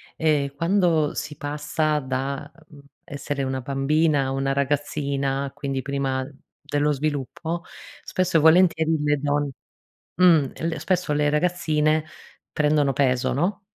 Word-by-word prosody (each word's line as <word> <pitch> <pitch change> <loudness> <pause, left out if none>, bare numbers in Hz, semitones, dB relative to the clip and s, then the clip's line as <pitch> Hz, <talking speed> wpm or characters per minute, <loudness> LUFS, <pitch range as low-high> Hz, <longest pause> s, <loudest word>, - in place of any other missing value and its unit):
ehm, 145 -3 0
quando 165 -2 +2
si 150 -1 -5
passa 150 +1 -1
da, 135 +2 -3 0.2
mhmm, 150 - -15 0.2
essere 145 -2 -4
una 130 0 -2
bambina 140 +3 +1
a - - -2
una 135 0 0
ragazzina, 140 -1 -1
quindi 135 -2 -3
prima 135 -1 -2 0.4
dello 145 +1 0
sviluppo, 155 +4 -3 0.4
spesso 185 -2 0
e - - +5
volentieri 160 0 +4
le 150 0 +2
don 145 0 0 0.7
mh, 185 - +2 0.4
l 165 - -2
spesso 180 -5 0
le 150 0 +2
ragazzine 155 -1 +1 0.5
prendono 150 -2 +2
peso, 130 -2 +1
no? 180 +9 -1
145 Hz, 125 wpm, -24 LUFS, 140-155 Hz, 0.7 s, e